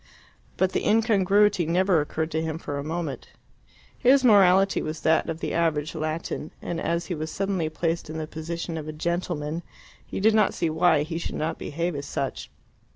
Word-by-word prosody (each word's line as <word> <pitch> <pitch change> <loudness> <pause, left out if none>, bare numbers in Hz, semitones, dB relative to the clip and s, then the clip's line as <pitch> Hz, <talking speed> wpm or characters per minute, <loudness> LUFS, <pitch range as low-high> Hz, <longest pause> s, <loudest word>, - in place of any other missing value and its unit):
But 190 0 +2
the - - -1
incongruity 205 -4 +3
never 180 0 +3
occurred 160 +2 -3
to 160 - 0
him 160 -1 -3
for 145 -3 -5
a - - -4
moment. 155 -4 -4 0.7
His 265 +2 +5
morality 195 -4 +5
was 155 +1 -5
that 160 +1 +2
of 165 0 -4
the - - -2
average 160 -2 0
Latin, 155 -1 -3
and 170 -1 -4
as 170 +1 -1
he 180 - -3
was 155 -1 -4
suddenly 190 -5 -1
placed 165 0 -2
in 160 - -5
the 155 - -3
position 165 +1 -5
of 155 - -7
a 155 - -5
gentleman, 165 -1 -2 0.4
he - - -6
did 215 +3 +4
not 215 -2 +3
see 165 -2 0
why 160 -2 +3
he 165 +2 -4
should - - -5
not 155 - -2
behave 165 +2 -3
as 140 0 -5
such. 135 - -4
165 Hz, 190 wpm, -25 LUFS, 155-185 Hz, 0.7 s, His